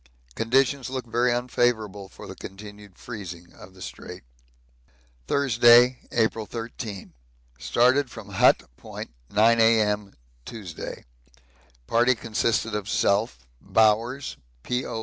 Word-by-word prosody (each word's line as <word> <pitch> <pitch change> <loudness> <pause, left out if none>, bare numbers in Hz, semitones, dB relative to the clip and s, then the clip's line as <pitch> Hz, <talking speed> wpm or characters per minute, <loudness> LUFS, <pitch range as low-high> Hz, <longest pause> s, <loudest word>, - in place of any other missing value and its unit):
Conditions 130 - +1
look 130 -2 -4
very 120 +2 +1
unfavourable 120 -5 -1
for - - -12
the - - -8
continued 105 0 -11
freezing 90 -7 -9
of 95 +1 -15
the 95 - -10
Strait. - - -9 1.0
Thursday, 120 -2 +5
April 110 -2 0
13. 115 -4 -7 0.5
Started 130 +3 +2
from 110 -4 -11
Hut 110 +6 +4
Point - - -9 0.2
9 115 +3 +4
A.M. 105 -3 +2 0.3
Tuesday. 95 - -8 0.8
Party 120 - +3
consisted 115 0 -1
of 105 -1 -3
self, 100 - 0 0.2
Bowers, 110 - +1 0.3
P.O. 125 -2 -3
115 Hz, 110 wpm, -25 LUFS, 105-120 Hz, 1.0 s, Thursday